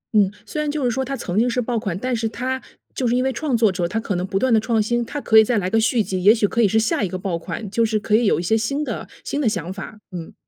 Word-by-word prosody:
嗯， 200 -2 +4
虽 305 - -3
然 300 - -1
就 290 -2 -2
是 245 - +2
说 265 +3 -1
它 275 +1 -3
曾 180 +3 -2
经 245 +2 +3
是 250 - -1
爆 240 -1 -1
款， 195 -5 -3
但 250 +4 -1
是 225 -1 -1
它 260 +3 -3 0.3
就 255 - -1
是 235 - +2
因 255 - +2
为 265 -1 0
创 265 -2 0
作 220 -4 +4
者 180 -2 -1
他 225 - -2
可 220 - -3
能 180 0 -1
不 195 0 -2
断 260 +3 +2
地 220 - +5
创 225 -1 +1
新， 240 +3 0
他 285 +5 -5
可 220 -5 +5
以 220 - +7
再 235 0 0
来 185 -2 0
个 225 - +3
续 225 0 +2
集， 185 -2 -3
也 210 +3 +8
许 210 -2 +2
可 235 - 0
以 210 - +5
是 220 +3 +2
下 225 -1 0
一 195 - +1
个 185 - -4
爆 180 -3 -2
款， 205 +5 -6
就 230 +2 +2
是 215 -1 +1
可 210 0 +1
以 235 +2 +3
有 200 - +3
一 175 - -3
些 220 +6 +2
新 275 +7 -1
的 - - -5 0.2
新 290 - -2
的 230 - +3
想 185 -2 -3
法， 205 +2 -8
嗯。 170 -2 -7
225 Hz, 355 characters per minute, -21 LUFS, 200-245 Hz, 0.3 s, 也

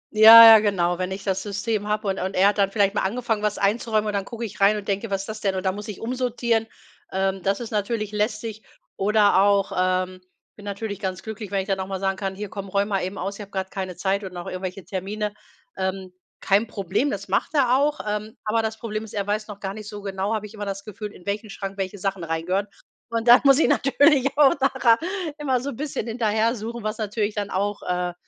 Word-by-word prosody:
Ja, 225 +2 +11
ja, 225 -1 +10
genau. 180 -4 0
Wenn 185 - -1
ich 190 +1 -6
das 190 -1 -1
System 205 +1 -2
habe 210 0 -1
und 195 - -1
und 190 +1 -3
er 195 +2 +5
hat 205 - -2
dann 195 -1 +3
vielleicht 200 -1 +2
mal - - 0
angefangen, 225 +1 -1
was 210 -1 -1
einzuräumen 215 +1 +1
und 210 - -2
dann 200 -1 -1
gucke 235 +1 -6
ich 205 -2 -9
rein 205 +2 +5
und 205 - -7
denke: 200 +2 -2
„Was 195 -1 -1
ist 195 - -9
das 215 0 -6
denn?“ 195 -2 0
Und 185 0 -4
dann 190 - +2
muss 210 +2 -7
ich 210 - -7
umsortieren. 235 -2 -1 0.4
Ähm, 190 0 -1
das 195 +4 0
ist 235 - -7
natürlich 215 0 -2
lästig 215 +1 -2 0.3
oder 205 -1 +3
auch 200 0 +3
ähm, 185 0 0 0.3
ich - - -85
bin 205 - -13
natürlich 200 0 -5
ganz 190 -2 -4
glücklich, 220 -2 -7
wenn 195 0 0
ich 190 - -8
dann 195 -1 0
auch 190 - -3
mal 195 -1 -4
sagen 195 0 0
kann: 195 -1 -3
„Hier 205 +1 -6
komm, 200 0 -7
räum 200 +2 0
mal 195 -2 0
eben 190 +3 -4
aus, 200 - -4
ich - - -6
habe 200 - -9
gerade 190 -1 -4
keine 185 -2 -5
Zeit 195 +2 -1
und 185 - -7
noch 175 -1 -7
irgendwelche 185 0 -6
Termine.“ 205 +3 -4 0.4
Ähm, 190 -1 -3 0.3
kein 205 +4 +2
Problem, 205 +6 -1
das 200 -3 -5
macht 195 +10 -1
er 255 -3 +4
auch, 290 +2 +1
ähm, 210 +2 -4
aber 225 +2 +1
das 220 0 -3
Problem 215 -1 -4
ist, 215 - -13
er 200 -2 -2
weiß 210 +1 -2
noch 205 -2 -10
gar 195 0 -4
nicht 215 -1 -9
so 210 -1 -8
genau, 195 +1 -2
habe 215 -1 -4
ich 210 - -11
immer 210 -1 -6
das 195 0 -5
Gefühl, 210 0 -7
in 175 - -16
welchen 205 +2 -3
Schrank 195 0 -6
welche 195 0 -3
Sachen 195 -2 -3
rein 165 0 -3
gehören. 195 +3 0 0.4
Und 230 0 -2
dann 240 +1 +9
muss 275 -1 +7
ich - - +4
natürlich 280 0 +4
auch 280 -3 +6
nachher 265 -4 +3 0.4
immer 265 -4 +1
so 280 +1 -4
bisschen 280 -3 -4
hinterher 225 0 +1
suchen, 230 +1 -6
was 215 +1 -3
natürlich 210 -1 -2
dann 205 -1 -3
auch 205 +2 -2
äh, 180 0 -2
205 Hz, 250 wpm, -24 LUFS, 195-220 Hz, 0.4 s, Ja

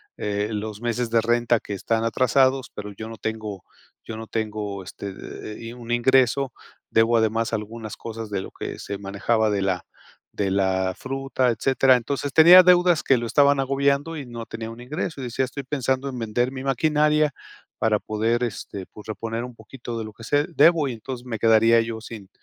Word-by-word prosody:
eh, 105 +1 -2
los 105 0 -4
meses 120 0 -1
de 115 0 +3
renta 120 +1 +2
que 105 - -7
están 115 +3 -1
atrasados, 130 +3 +2
pero 105 0 -7
yo 110 +3 -8
no 115 - -9
tengo 110 -4 -5 0.4
yo 110 - -6
no 110 0 -7
tengo 105 -3 -3
este 100 +2 -7
eh 100 +2 -8
eh, - - -10
y 115 - -7
un 120 -1 -9
ingreso, 130 +1 +3 0.4
debo 115 +1 +4
además 110 +1 +1
algunas 110 0 -5
cosas 115 -1 -7
de 100 -2 -2
lo - - -9
que - - -7
se 100 - -5
manejaba 105 +3 0
de 100 -2 0
la 95 -2 -1 0.5
de 100 -2 0
la 95 -1 +1
fruta", 135 -1 -1
etcétera. 130 +2 +3
Entonces 140 +3 -2
tenía 175 +3 +9
deudas 180 -2 +5
que 135 - +4
lo 120 - -3
estaban 140 +2 +4
agobiando 140 +4 0
y 140 - -6
no 120 -2 -7
tenía 115 0 -6
un 115 +1 -11
ingreso 150 +2 -4
y - - -4
decía: 125 +2 -1
"Estoy 140 +2 -6
pensando 130 0 -1
en 125 - -6
vender 120 +3 0
mi 130 -1 -6
maquinaria 150 +2 +2 0.5
para 110 -2 +2
poder, 115 +3 0
este 100 -4 -5
pues, 105 - -13
reponer 115 +2 -4
un 125 - -8
poquito 120 +1 -8
de 110 - -4
lo 110 - -8
que 115 - -14
se 145 +6 +1
debo 165 -2 +4
y 125 - -3
entonces 120 +2 -7
me 115 -3 -4
quedaría 115 +1 +5
yo 115 -1 -5
sin 110 -4 -10
115 Hz, 200 wpm, -24 LUFS, 110-135 Hz, 0.5 s, tenía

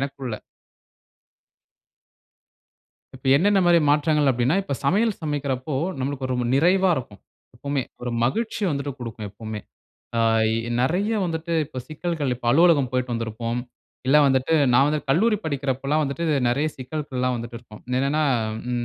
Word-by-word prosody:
எனக்குள்ள! 135 -4 -4 2.8
இப்ப 130 +1 -7
என்னென்ன 195 +6 +3
மாதிரி 175 -1 +6
மாற்றங்கள் 150 -1 +3
அப்படின்னா, 125 +7 +1
இப்ப 185 - -3
சமையல் 210 +9 +2
சமைக்கறப்போ 140 -2 -2 0.2
நம்மளுக்கு 135 0 -3
ஒரு 130 - -2
ரொம் 125 -1 -1
நிறைவா 185 +5 +4
இருக்கும், 115 -7 -7 0.4
எப்போமே. 140 +2 -2 0.2
ஒரு 125 0 -3
மகிழ்ச்சி 220 - -1
வந்துட்டு 140 -1 -2
கொடுக்கும் 115 -3 -6
எப்போமே. 110 +1 -7 0.6
அ - - +3 0.6
நெறைய 185 - +1
வந்துட்டு 165 0 -3
இப்போ 135 -3 -8
சிக்கல்கள் 155 -3 -2
இப்ப 120 0 -8
அலுவலகம் 155 -5 +4
போய்ட்டு 125 -1 -1
வந்திருப்போம். 115 +1 -3 0.5
இல்ல 135 - +5
வந்துட்டு 135 +3 +2 0.2
நான் 135 +3 +5
வந்து 150 0 +1
கல்லூரி 210 +9 +3
படிக்கிறப்பல்லாம் 140 0 -1
வந்துட்டு 145 +4 -3 0.2
நெறைய 140 +6 +1
சிக்கல்கள் 135 0 -5
எல்லாம் 125 0 +1
வந்துட்டு 115 0 -6
இருக்கும். 110 -3 -14 0.2
என்னன்னா, 140 +4 +1 0.5
ம் 120 -1 -1
140 Hz, 135 wpm, -23 LUFS, 125-155 Hz, 2.8 s, மாதிரி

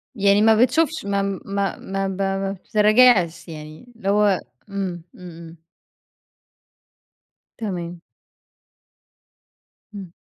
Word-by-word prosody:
يعني 200 0 +3
ما 220 +1 +5
بتشوفش 305 +7 +2
ما 200 0 0 0.2
ما 200 0 -2
ما 195 0 -3
ب 190 -1 -5
ب - - -3
ما 195 0 -1
بتراجعش 210 -2 +3
يعني 155 +9 -11
اللي 200 -4 -4
هو، 205 -2 +3 0.3
امم، 190 -4 -4
امم - - -16
امم. 165 0 -13 2.0
تمام. 175 -5 -5 1.9
امم. 195 -4 -9
195 Hz, 105 wpm, -22 LUFS, 180-210 Hz, 2.0 s, ما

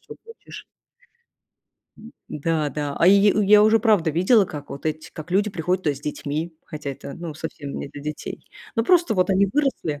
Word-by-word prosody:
чё - - -12
хочешь. 455 0 -12 1.4
М, 225 +3 -13 0.2
да, 155 0 -1
да. 145 0 -4
А, 170 - +4
йи 200 +2 +6
э, 210 - +1
я 210 +1 +7
уже 220 +1 +5
правда 205 -7 +2
видела, 190 - +4
как 150 -5 -9
вот 140 - -6
эти 155 0 -4
как 155 +2 -9
люди 200 +3 +1
приходят 180 +1 -1
туда 150 - +1
с 135 - -12
детьми, 150 +3 -4
хотя 150 -3 -6
это, 140 - -8
ну, 165 -3 -7
совсем 145 -3 -6
не - - -6
для 145 - -10
детей. 150 +1 -7 0.3
Но 225 - +2
просто 340 -8 +3
вот 185 0 +1
они 195 +1 +3
выросли 240 - -1
170 Hz, 200 wpm, -23 LUFS, 150-210 Hz, 1.4 s, я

